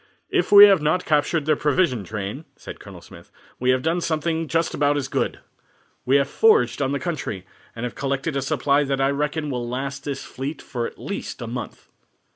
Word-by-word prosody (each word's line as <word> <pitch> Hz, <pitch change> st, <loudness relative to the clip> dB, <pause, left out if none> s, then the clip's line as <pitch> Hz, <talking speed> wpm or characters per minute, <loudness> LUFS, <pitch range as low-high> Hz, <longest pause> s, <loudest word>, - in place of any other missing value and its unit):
"If -, -, +1 dB
we 205 Hz, 0 st, +11 dB
have 195 Hz, -5 st, +4 dB
not 180 Hz, +5 st, +1 dB
captured 150 Hz, 0 st, +1 dB
their 155 Hz, 0 st, +3 dB
provision 150 Hz, -, +1 dB
train," 105 Hz, -, -6 dB
said -, -, -10 dB
Colonel -, -, -12 dB
Smith, -, -, -15 dB, 0.3 s
"we 125 Hz, -, 0 dB
have 130 Hz, 0 st, +2 dB
done 165 Hz, +2 st, 0 dB
something 160 Hz, 0 st, -1 dB
just 165 Hz, +1 st, 0 dB
about 145 Hz, 0 st, +1 dB
as 135 Hz, -2 st, -2 dB
good. -, -, -2 dB, 0.6 s
We 130 Hz, -, +3 dB
have 140 Hz, -1 st, +3 dB
foraged 440 Hz, -, +3 dB
on 135 Hz, -1 st, 0 dB
the 140 Hz, -, -1 dB
country, 145 Hz, -, -4 dB, 0.3 s
and 115 Hz, -, -6 dB
have 125 Hz, -, -3 dB
collected 140 Hz, +2 st, -2 dB
a 135 Hz, -, 0 dB
supply 140 Hz, +2 st, +1 dB
that 135 Hz, -1 st, -2 dB
I 135 Hz, +1 st, +2 dB
reckon 150 Hz, +1 st, -2 dB
will 120 Hz, -2 st, -3 dB
last 135 Hz, +2 st, -4 dB
this 140 Hz, -2 st, -4 dB
fleet 140 Hz, +3 st, -6 dB
for 120 Hz, -2 st, -4 dB
at -, -, -12 dB
least -, -, -6 dB
a -, -, -5 dB
month." -, -, -7 dB
140 Hz, 205 wpm, -23 LUFS, 135-160 Hz, 0.6 s, we